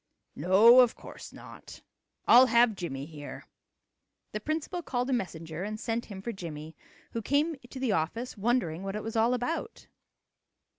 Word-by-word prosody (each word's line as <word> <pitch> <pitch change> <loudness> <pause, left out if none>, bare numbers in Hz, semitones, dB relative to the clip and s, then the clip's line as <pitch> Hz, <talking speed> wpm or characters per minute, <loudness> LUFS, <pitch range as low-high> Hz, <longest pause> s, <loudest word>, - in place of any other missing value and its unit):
"No, 205 - +6
of 245 -2 +5
course - - -11
not. - - -13 0.4
I'll 255 +2 +8
have 235 -1 +4
Jimmie 140 -8 -5
here." 150 -2 -9 0.9
The 210 - -3
principal 315 - -3
called 250 -3 -2
a - - +2
messenger 165 -6 -4
and 215 +1 -5
sent 230 +1 -2
him 195 -2 -9
for 235 - -3
Jimmie, 160 -5 -8 0.4
who 230 - -3
came 295 +7 +1
to 265 - -8
the 260 -4 0
office 200 +9 -2
wondering 205 -6 0
what 195 +1 -4
it 210 - -4
was 225 0 -5
all 230 +3 +3
about. 330 - -4
225 Hz, 160 wpm, -29 LUFS, 180-250 Hz, 0.9 s, I'll